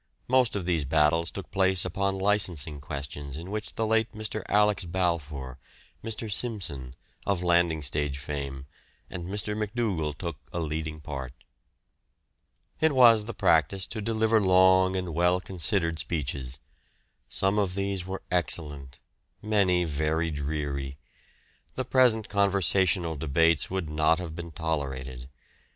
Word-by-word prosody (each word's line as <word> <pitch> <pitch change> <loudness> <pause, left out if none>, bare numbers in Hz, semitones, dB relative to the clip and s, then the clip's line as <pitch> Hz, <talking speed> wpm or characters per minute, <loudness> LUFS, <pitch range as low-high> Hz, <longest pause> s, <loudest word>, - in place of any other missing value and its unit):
Most 125 -3 +3
of 95 -4 -2
these 85 -4 +1
battles 80 +4 +2
took 100 - -8
place 95 -2 +2
upon 95 +2 -1
licensing 90 -7 0
questions 70 0 -6
in 85 +4 -7
which 105 0 -4
the 110 - 0
late 110 +1 +1
Mr. 110 0 -3
Alex. 105 -1 +3
Balfour, 80 -7 -2 0.4
Mr. 110 -1 -3
Simpson, 85 - -2 0.3
of 95 -3 +1
landing 85 -3 +2
stage 70 0 -1
fame, 70 -1 -5 0.5
and 85 - -5
Mr. 105 +3 -3
McDougal 105 -9 -1
took 85 -5 -4
a - - -5
leading 80 0 -3
part. 65 -4 -6 1.5
It 160 -1 +3
was 115 -4 +7
the 120 - -6
practice 85 +4 +2
to 110 - -6
deliver 110 0 +2
long 95 0 +5
and 90 -3 -2
well 90 +2 +3
considered 85 -2 -1
speeches. 65 -4 -3 0.7
Some 95 +2 +2
of 95 -3 0
these 100 -2 -1
were 95 +1 -6
excellent, 75 -6 -2 0.4
many 100 -4 +2
very 80 +1 0
dreary. 70 -2 -3 0.8
The 130 - -2
present 120 -4 +3
conversational 95 -4 +2
debates 80 +2 +2
would 95 -3 -2
not 75 +1 +2
have 85 -3 -6
been 85 0 -6
tolerated. 65 -6 -4
85 Hz, 135 wpm, -27 LUFS, 75-100 Hz, 1.5 s, was